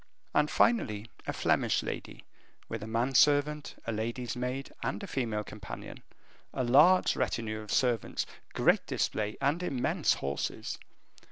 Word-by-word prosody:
And, 150 0 +3
finally, 115 - +2 0.2
a - - 0
Flemish - - +1
lady, - - -6 0.4
with 115 - -5
a 110 - -6
man 115 +4 0
servant, 145 +2 +3
a 115 - -1
lady's 115 +3 -3
maid, 125 +2 -3
and - - -2
a - - -3
female 115 - -2
companion, 105 -2 -9 0.5
a 130 - 0
large 150 +10 +5
retinue 110 -4 -2
of 105 - -8
servants, 120 -4 +1 0.3
great - - +3
display, 105 0 -1
and 140 +5 +1
immense 135 -8 +1
horses. 70 +1 -3
125 Hz, 140 wpm, -30 LUFS, 110-145 Hz, 0.5 s, large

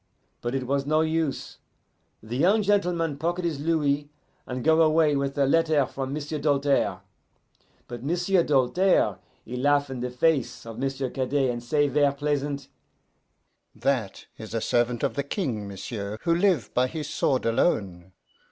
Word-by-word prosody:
But 120 +2 -2
it 130 -1 -2
was 140 +1 -1
no 155 +1 +3
use: 160 -2 -2 0.6
the 110 +2 -6
young 195 - +3
gentleman 175 -7 +1
pocket 175 +3 -1
his 160 -4 -2
louis, 145 -2 0 0.4
and 125 -1 -4
go 160 0 +4
away 155 -1 +4
with 140 0 -2
a 140 - +3
letter 155 -1 +3
from 135 +1 -5
M'sieu' 150 +1 -4
Doltaire. 140 -1 +1 0.9
But 120 -1 -7
M'sieu' 175 +4 +2
Doltaire, 150 +7 +2 0.3
he 120 - -6
laugh 145 +1 +2
in 130 - -5
the 125 +1 -3
face 135 0 0
of 115 0 -8
M'sieu' 135 -1 -2
Cadet, 135 0 0
and 120 0 -5
say 145 +4 +1
ver' 145 0 +2
pleasant, 140 -1 -2 1.1
'That 125 -8 -1
is 110 +1 -7
a 115 - 0
servant 120 +1 0
of - - +1
the 140 - -1
King, 135 - -3
m'sieu', 100 +1 -6
who 170 - +2
live 175 - +1
by 125 +1 +2
his 150 +1 -5
sword 140 -3 0
alone. 95 - 0
140 Hz, 160 wpm, -26 LUFS, 125-160 Hz, 1.1 s, go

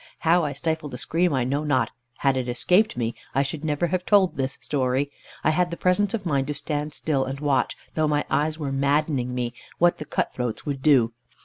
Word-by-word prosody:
How 170 +1 +4
I 145 -2 -1
stifled 150 -1 -2
a - - -5
scream 170 +6 +1
I 130 -3 +1
know 140 +4 -1
not; 145 -4 +1 0.3
had 135 -1 +2
it 125 -1 -2
escaped 180 - +2
me, 115 -1 -1 0.2
I 135 - +4
should 145 +2 -5
never 150 +2 0
have 180 +1 -1
told 195 -2 +4
this 135 0 -2
story. 135 0 0 0.3
I 155 - +4
had 175 +2 +2
the 170 - -5
presence 200 +4 +2
of 205 -4 -5
mind 140 -5 +1
to 150 - -2
stand 150 +1 -3
still, 140 -3 0
and 135 +1 -4
watch, 140 -3 +1 0.2
though 155 -1 +1
my 150 0 +1
eyes 155 +1 +1
were 145 -4 -3
maddening 140 -2 +1
me, 120 -1 -2 0.2
what 175 0 +3
the 150 - -5
cut - - -1
throats 125 -3 -3
would 140 -2 -3
do. 130 -6 +4
145 Hz, 220 wpm, -25 LUFS, 135-160 Hz, 0.3 s, How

